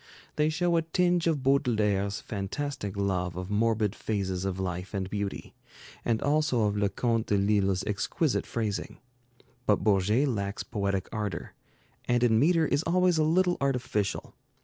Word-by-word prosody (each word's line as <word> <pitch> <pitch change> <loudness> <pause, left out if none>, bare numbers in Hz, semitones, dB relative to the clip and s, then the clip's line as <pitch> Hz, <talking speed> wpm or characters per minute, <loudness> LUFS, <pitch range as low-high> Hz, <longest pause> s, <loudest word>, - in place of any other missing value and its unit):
They 150 0 +2
show 170 +2 +1
a - - +3
tinge 175 +1 +1
of 150 -5 0
Baudelaire's 105 -7 +1
fantastic 105 +1 -4
love 90 -3 -1
of 90 +2 -5
morbid 110 -1 +1
phases 95 -4 -2
of 95 -1 -2
life 90 +1 -4
and 95 -1 -2
beauty, 100 -1 -4 0.5
and 115 -2 +1
also 145 -5 +2
of 105 -1 +1
Leconte 110 +3 0
de 105 - +2
Lisle's 100 -2 +2
exquisite 115 +8 -1
phrasing. 110 -4 -3 0.7
But 105 -2 +3
Bourget 105 +6 +3
lacks 100 -4 -2
poetic 100 -4 -2
ardor, 105 -5 -4 0.5
and 120 0 +2
in 110 -2 +4
metre 165 +3 +4
is 145 -1 +1
always 180 0 +2
a - - +4
little 175 +3 +2
artificial. 125 -7 -1
110 Hz, 150 wpm, -28 LUFS, 100-145 Hz, 0.7 s, in